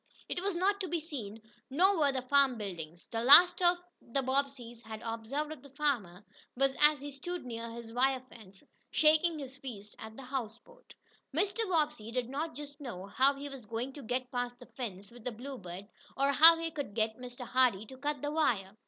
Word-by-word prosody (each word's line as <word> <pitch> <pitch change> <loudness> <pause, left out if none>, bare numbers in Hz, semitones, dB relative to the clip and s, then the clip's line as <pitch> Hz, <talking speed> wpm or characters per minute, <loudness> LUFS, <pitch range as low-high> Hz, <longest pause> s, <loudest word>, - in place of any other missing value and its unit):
It 355 - -3
was 395 -1 -1
not 395 +3 +2
to 375 - -1
be 340 0 -1
seen, 225 -9 -7 0.3
nor 360 +7 +3
were 290 -2 +4
the 260 -2 -3
farm 275 -1 +3
buildings. 175 -5 -7
The 230 0 -3
last 345 +7 +9
the 350 -7 0
Bobbseys 260 -3 -2
had 220 -2 -8
observed 230 +7 -3
of 310 - -8
the 280 - -14
farmer 245 - -2 0.3
was 270 +1 +2
as 295 -1 +5
he 290 0 -6
stood 350 +4 -6
near 230 -1 -5
his 230 0 -9
wire 260 +1 +2
fence, 195 -6 -15 0.3
shaking 315 +2 +4
his 275 -2 -8
fist 215 -7 -9
at 220 0 -9
the 270 - -8
houseboat. 265 - -7 0.4
Mr. 405 +3 0
Bobbsey 300 -10 0
did 245 0 -2
not 305 +4 -3
just 290 0 -9
know 215 -9 -6
how 265 +7 +3
he 280 +1 -6
was 270 -6 -10
going 235 +4 -3
to 285 - -9
get 250 +1 -3
past 245 -1 -3
the 245 - -13
fence 205 -6 -7
with 240 -1 -14
the 250 - -2
Bluebird, 215 -6 -8 0.3
or 275 +1 +3
how 325 +4 +9
he 330 0 -3
could 285 -10 -5
get 220 0 0
Mr. 250 0 -8
Hardee 245 -5 +2
to 260 +4 -12
cut 290 0 -3
the 290 - -1
wire. 215 -11 +1
265 Hz, 200 wpm, -32 LUFS, 230-295 Hz, 0.4 s, last